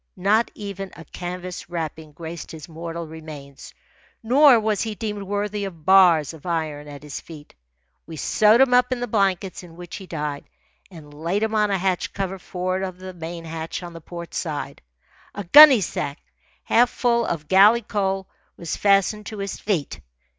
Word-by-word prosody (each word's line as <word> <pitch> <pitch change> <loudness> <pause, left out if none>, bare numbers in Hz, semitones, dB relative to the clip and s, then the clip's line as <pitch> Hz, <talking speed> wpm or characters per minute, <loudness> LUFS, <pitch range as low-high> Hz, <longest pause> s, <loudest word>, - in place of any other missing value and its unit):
Not 210 +5 +2
even 195 -2 -6
a 165 - -12
canvas 180 +2 -7
wrapping 160 -2 -5
graced 165 +1 -8
his 155 -3 -9
mortal 165 0 -6
remains; 155 -3 -11 0.5
nor 260 +1 +6
was 215 -1 0
he 220 -2 -3
deemed 210 -1 -4
worthy 205 +1 -3
of 170 -6 -8
bars 180 -7 +5
of 160 - -13
iron 155 -4 -3
at 145 -1 -10
his 150 -2 -7
feet. 150 -3 -13 0.5
We 160 -1 -8
sewed 215 - +4
him 265 -2 +4
up 250 +1 +4
in 255 - -1
the 245 - -2
blankets 195 -4 0
in 170 -2 -14
which 175 0 -8
he 190 - -10
died 150 -4 -5 0.4
and 155 -5 -13
laid 170 +8 -2
him 220 0 -1
on 210 -1 +2
a 195 - +1
hatch 185 -1 -1
cover 195 -1 -3
for'ard 185 +1 -3
of 185 -2 -4
the 185 0 -9
main 165 0 -7
hatch 165 +2 -5
on 175 -1 -8
the 165 - -10
port 170 +1 -9
side. 145 -4 -4 0.5
A 205 - -4
gunnysack, 210 - +6 0.5
half 240 +1 +4
full 235 -1 +1
of 155 -8 -3
galley 205 +7 +6
coal, 195 -2 -2 0.3
was 170 -2 -4
fastened 200 +1 +2
to 215 - -7
his 200 -1 -5
feet. 180 -9 -2
185 Hz, 175 wpm, -23 LUFS, 160-205 Hz, 0.5 s, nor